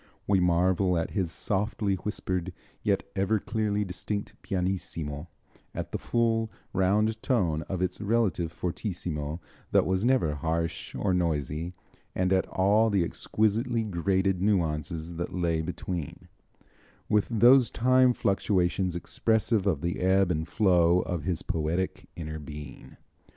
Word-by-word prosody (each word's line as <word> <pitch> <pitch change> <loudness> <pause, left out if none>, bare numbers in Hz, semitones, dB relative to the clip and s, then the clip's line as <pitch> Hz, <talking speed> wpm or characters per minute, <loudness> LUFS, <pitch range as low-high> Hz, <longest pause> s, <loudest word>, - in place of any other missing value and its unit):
We 100 -1 +3
marvel 90 +1 +2
at 80 - -2
his 95 -5 -1
softly 100 +3 -1
whispered, 95 -2 -3 0.3
yet 100 -2 +1
ever 100 +3 +2
clearly 105 -1 -1
distinct 95 +3 -4
pianissimo, 85 -5 -3 0.5
at - - -4
the - - -3
full, 115 -1 +1 0.2
round 105 +4 +2
tone 90 - +1
of 95 -2 -1
its 90 +2 -2
relative 105 -6 +1
fortissimo, 85 -4 -4 0.3
that - - +4
was 95 +1 0
never 120 - +3
harsh 80 +2 -2
or 95 - 0
noisy, 80 -1 -1 0.4
and 90 0 +2
at 95 - +2
all 105 +4 +3
the 100 -4 +2
exquisitely 110 +6 0
graded 95 -1 0
nuances 85 -3 -1
that 85 +2 -4
lay 85 -3 +1
between, 85 -1 -5 0.8
with 105 -1 +2
those 120 +2 +6
time 130 +1 +4
fluctuations 95 -4 +1
expressive 110 +4 +1
of 80 -7 +1
the 85 0 -2
ebb 95 0 +3
and 80 -1 -1
flow 90 -3 +4
of 85 -4 -4
his 90 -3 -1
poetic 80 +4 -2
inner 80 -2 -5
being. 75 -2 -10
95 Hz, 130 wpm, -28 LUFS, 85-105 Hz, 0.8 s, those